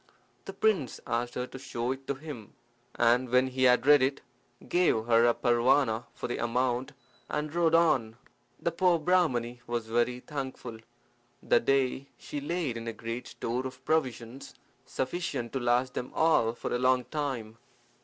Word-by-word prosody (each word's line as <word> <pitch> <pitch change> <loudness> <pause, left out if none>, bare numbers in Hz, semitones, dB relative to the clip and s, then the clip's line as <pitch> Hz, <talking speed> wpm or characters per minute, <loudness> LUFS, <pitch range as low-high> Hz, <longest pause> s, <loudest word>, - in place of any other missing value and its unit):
The - - -7
prince 190 - 0
asked 120 +1 -2
her 125 - -2
to 130 - -10
show 120 -2 -3
it 135 0 -6
to 140 - -1
him, 135 -7 -9 0.4
and 120 +2 +3
when 125 +1 +4
he 130 0 0
had 125 0 +4
read 145 -1 +7
it 135 +2 0 0.5
gave 175 -11 +2
her 115 0 +5
a 120 - +3
parwana 120 0 +2
for - - -4
the 120 - -3
amount, 125 +1 -1 0.4
and 150 0 -3
rode 165 -1 +3
on. 130 -10 +2 0.4
The 170 - -1
poor 175 +1 +3
Brahmani 145 -9 +1
was 120 -1 -2
very 120 +2 0
thankful. 130 -5 -6 0.6
That 120 - +2
day 135 0 +1
she 145 - -6
laid 150 -5 -2
in 115 0 -7
a 115 - -3
great 115 +2 -6
store 125 +3 -3
of 130 - -13
provisions, 130 -4 -2 0.3
sufficient 130 -4 -3
to 135 - -1
last 125 +1 +1
them 125 - -5
all 155 -8 +3
for - - -5
a 120 - 0
long 125 0 +3
time. 125 -7 -4
125 Hz, 165 wpm, -29 LUFS, 120-145 Hz, 0.6 s, read